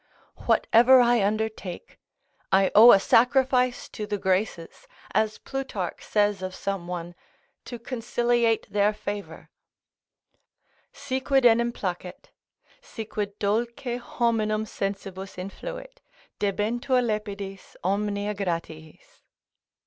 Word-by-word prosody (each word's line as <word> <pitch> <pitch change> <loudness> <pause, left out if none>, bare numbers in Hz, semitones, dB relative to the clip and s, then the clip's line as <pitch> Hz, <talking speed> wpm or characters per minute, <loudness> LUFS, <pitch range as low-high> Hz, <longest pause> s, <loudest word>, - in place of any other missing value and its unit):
Whatever 250 +3 +5
I 240 -3 +4
undertake, 210 -3 -3 0.5
I 190 0 +4
owe 230 +4 +9
a 195 - +7
sacrifice 250 +3 +2
to 210 -2 -6
the 205 - -2
Graces, 190 - -2 0.3
as 215 0 +1
Plutarch 260 -10 -5
says 205 -2 +1
of 185 0 -5
some 195 -3 -4
one, 175 -1 -5 0.5
to 240 - -7
conciliate 235 -1 0
their 205 +1 +3
favour: 205 -1 -7 1.4
"Si 275 -2 -3
quid 270 -1 +2
enim 235 0 +4
placet, 180 -4 -6 0.5
Si 225 - -8
quid 205 -1 -4
dulce 225 +4 0
horninum 235 -3 -1
sensibus 195 -2 -5
influit, - - -8 0.4
Debentur 225 +6 0
lepidis 200 -3 -5
omnia 205 +2 -1
Gratiis." 175 - -6
210 Hz, 105 wpm, -25 LUFS, 195-240 Hz, 1.4 s, owe